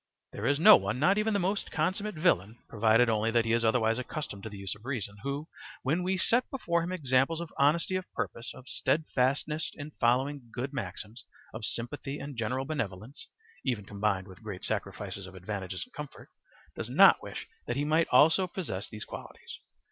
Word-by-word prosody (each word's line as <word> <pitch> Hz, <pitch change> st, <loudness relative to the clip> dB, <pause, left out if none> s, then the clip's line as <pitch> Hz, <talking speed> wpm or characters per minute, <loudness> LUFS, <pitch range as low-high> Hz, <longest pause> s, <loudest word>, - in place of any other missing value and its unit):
There -, -, -3 dB
is 145 Hz, +1 st, +2 dB
no 165 Hz, -, +10 dB
one, 100 Hz, +4 st, -2 dB
not 185 Hz, +9 st, +3 dB
even 220 Hz, +1 st, +1 dB
the 200 Hz, -, +2 dB
most 195 Hz, +3 st, -1 dB
consummate 200 Hz, +2 st, -1 dB
villain, 115 Hz, -, +2 dB
provided 115 Hz, +2 st, +4 dB
only 110 Hz, 0 st, +2 dB
that 115 Hz, 0 st, +2 dB
he 115 Hz, -, +1 dB
is 115 Hz, 0 st, +2 dB
otherwise 115 Hz, 0 st, +2 dB
accustomed 125 Hz, -5 st, -5 dB
to 110 Hz, -, -6 dB
the 105 Hz, -, -9 dB
use 95 Hz, -1 st, -1 dB
of 105 Hz, -, -15 dB
reason, 110 Hz, -6 st, -3 dB
who, 140 Hz, +3 st, -3 dB, 0.4 s
when 155 Hz, +7 st, +1 dB
we 185 Hz, +1 st, 0 dB
set 235 Hz, +6 st, +2 dB
before 170 Hz, -10 st, 0 dB
him 170 Hz, +2 st, -3 dB
examples 140 Hz, -1 st, +2 dB
of 170 Hz, -1 st, -6 dB
honesty 160 Hz, +6 st, +3 dB
of 185 Hz, -1 st, -4 dB
purpose, 115 Hz, -, -4 dB
of 130 Hz, -, -13 dB
steadfastness 150 Hz, +1 st, 0 dB
in 150 Hz, 0 st, -7 dB
following 130 Hz, +1 st, +1 dB
good 130 Hz, +4 st, -4 dB
maxims, 110 Hz, -4 st, -5 dB, 0.3 s
of 110 Hz, -1 st, -4 dB
sympathy 135 Hz, +5 st, -4 dB
and 140 Hz, -1 st, -7 dB
general 125 Hz, +4 st, -1 dB
benevolence 115 Hz, -4 st, -4 dB, 0.4 s
(even 120 Hz, -7 st, -1 dB
combined 100 Hz, -1 st, -1 dB
with 95 Hz, +2 st, -13 dB
great 100 Hz, -4 st, -6 dB
sacrifices 100 Hz, -1 st, -4 dB
of 95 Hz, -, -12 dB
advantages 95 Hz, 0 st, -4 dB
and 250 Hz, -, -28 dB
comfort), 150 Hz, -2 st, -9 dB, 0.5 s
does -, -, -5 dB
not -, -, +7 dB
wish -, -, -7 dB, 0.2 s
that 120 Hz, -, -1 dB
he 145 Hz, -, 0 dB
might 160 Hz, +2 st, +3 dB
also 160 Hz, +8 st, +5 dB
possess 110 Hz, -, -4 dB
these 105 Hz, -1 st, -7 dB
qualities. -, -, -9 dB
130 Hz, 190 wpm, -30 LUFS, 110-155 Hz, 0.5 s, no